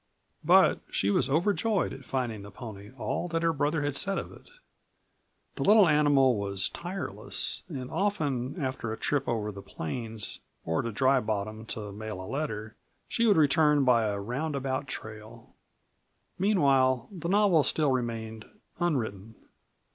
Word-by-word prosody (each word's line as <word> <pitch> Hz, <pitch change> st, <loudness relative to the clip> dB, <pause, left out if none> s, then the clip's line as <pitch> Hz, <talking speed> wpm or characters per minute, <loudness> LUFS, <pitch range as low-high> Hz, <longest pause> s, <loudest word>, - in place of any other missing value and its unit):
But -, -, +5 dB
she 100 Hz, -, 0 dB
was -, -, +1 dB
overjoyed 190 Hz, +6 st, +1 dB
at 135 Hz, -1 st, -11 dB
finding 120 Hz, -6 st, -2 dB
the 100 Hz, -, -10 dB
pony 105 Hz, -1 st, -9 dB
all 175 Hz, -, -2 dB
that 165 Hz, -1 st, -2 dB
her 165 Hz, 0 st, +2 dB
brother 145 Hz, +1 st, 0 dB
had 145 Hz, -1 st, -1 dB
said 195 Hz, +7 st, +1 dB
of -, -, -5 dB
it. -, -, -16 dB, 1.1 s
The -, -, -1 dB
little 210 Hz, -2 st, +6 dB
animal 145 Hz, -5 st, +4 dB
was 100 Hz, -1 st, +1 dB
tireless, 175 Hz, +3 st, -1 dB
and 130 Hz, -6 st, -6 dB
often, 155 Hz, -7 st, -1 dB
after 130 Hz, -5 st, -3 dB
a 110 Hz, -, -4 dB
trip 140 Hz, -2 st, -1 dB
over 105 Hz, -2 st, -1 dB
the 100 Hz, -1 st, -9 dB
plains, 110 Hz, +6 st, -4 dB, 0.3 s
or 80 Hz, 0 st, 0 dB
to 115 Hz, -, -4 dB
Dry 130 Hz, +5 st, +3 dB
Bottom 110 Hz, 0 st, -4 dB
to 105 Hz, -3 st, -5 dB
mail 105 Hz, -1 st, -6 dB
a 95 Hz, -, -7 dB
letter, 110 Hz, -5 st, -4 dB, 0.3 s
she 230 Hz, 0 st, +1 dB
would 205 Hz, -5 st, +5 dB
return 150 Hz, -1 st, +4 dB
by 120 Hz, -3 st, +4 dB
a 100 Hz, -1 st, -1 dB
roundabout 135 Hz, +4 st, -3 dB
trail. 110 Hz, -4 st, -9 dB, 0.9 s
Meanwhile 135 Hz, -, +3 dB
the 170 Hz, -3 st, -5 dB
novel 200 Hz, -5 st, +4 dB
still 150 Hz, 0 st, +1 dB
remained 115 Hz, -3 st, -3 dB, 0.3 s
unwritten. 110 Hz, -, -2 dB
130 Hz, 150 wpm, -28 LUFS, 110-155 Hz, 1.1 s, little